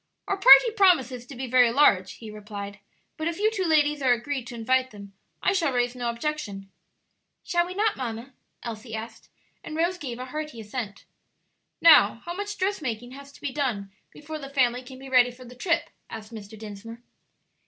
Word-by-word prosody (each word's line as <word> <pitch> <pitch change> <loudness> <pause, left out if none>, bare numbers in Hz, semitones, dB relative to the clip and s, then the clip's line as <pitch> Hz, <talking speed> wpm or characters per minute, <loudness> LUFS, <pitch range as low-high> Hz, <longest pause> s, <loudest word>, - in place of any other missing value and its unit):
"Our 395 - 0
party 470 +3 +9
promises 265 - +3
to 275 - -10
be 260 +2 -4
very 250 -1 +5
large," 200 -9 +4
he 220 -2 -10
replied; 205 -1 -8 0.4
"but 315 - -2
if 335 -1 -2
you 430 +2 +2
two 385 -4 -2
ladies 300 -2 +2
are 255 -2 +4
agreed 250 +1 -4
to 240 - -8
invite 255 +3 +1
them 200 -2 -12 0.3
I - - +3
shall 335 -7 +1
raise 245 -1 0
no 245 -1 -3
objection." 235 -7 -4 0.7
"Shall 345 0 +1
we 365 - -7
not, 425 +1 +1
mamma?" 240 +1 -5 0.3
Elsie 225 -1 -6
asked, 220 +1 -8 0.3
and 310 - -7
Rose 350 +2 0
gave 250 -6 -5
a 255 - -6
hearty 300 -2 -6
assent. 210 -2 -6 0.8
"Now, 235 -9 +6
how 345 - -4
much 410 +2 -5
dressmaking 255 - -2
has 280 +1 -11
to - - -17
be 285 - -3
done 240 -9 -2 0.2
before 310 +1 -8
the 275 -2 -8
family 250 -3 +1
can 260 +1 -12
be 270 +1 -11
ready 250 -2 +5
for 250 +1 -13
the 245 - -12
trip?" 335 +7 -1 0.2
asked 215 +1 -9
Mr. 215 0 -10
Dinsmore. 220 +2 -10
255 Hz, 190 wpm, -26 LUFS, 230-305 Hz, 0.8 s, party